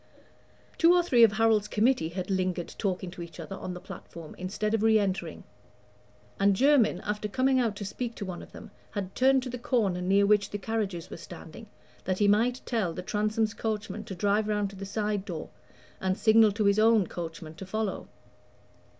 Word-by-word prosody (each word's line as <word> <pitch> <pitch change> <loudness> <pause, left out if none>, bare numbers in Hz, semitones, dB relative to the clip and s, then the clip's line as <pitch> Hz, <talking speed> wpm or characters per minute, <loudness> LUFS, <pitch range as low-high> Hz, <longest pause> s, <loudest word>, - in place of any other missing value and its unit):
Two 340 +1 +6
or 355 - +4
three 250 -8 +3
of 220 -2 +6
Harold's 220 -1 +3
committee 220 -6 +2
had 180 +2 -4
lingered 185 -2 -1
talking 185 -3 -2
to 175 - -9
each 170 -1 -9
other 195 - -6
on 185 -1 -6
the - - -7
platform, 165 -2 -10
instead 210 +4 -2
of 225 - +1
re 220 0 +5
entering; 195 -2 -2 1.0
and 200 0 +4
Jermyn, 270 0 +3
after 210 0 -2
coming 260 +4 +2
out 230 -4 0
to 205 - -6
speak 230 +4 -4
to 205 - -5
one 180 -2 -6
of - - -13
them, - - -11 0.2
had 195 -2 -5
turned 265 0 +3
to 255 - -5
the 250 - -5
corner 210 -8 0
near 195 +2 +3
which 205 0 +3
the 205 - -4
carriages 200 -5 -3
were - - -6
standing, 170 +5 -11 0.4
that 185 -1 0
he 205 - +3
might 235 +5 +2
tell 215 -8 -1
the - - -6
Transome's 215 +2 0
coachman 215 -1 -4
to 190 - -7
drive 205 +4 +1
round 210 -2 0
to - - -12
the 195 0 -7
side 210 -1 -1
door 170 -5 -6 0.5
and 190 0 -1
signal 220 -1 +5
to 210 0 0
his 200 +1 +4
own 220 -2 +5
coachman 165 -2 -7
to 190 - -9
follow. 215 0 -3
205 Hz, 200 wpm, -28 LUFS, 190-225 Hz, 1.0 s, Two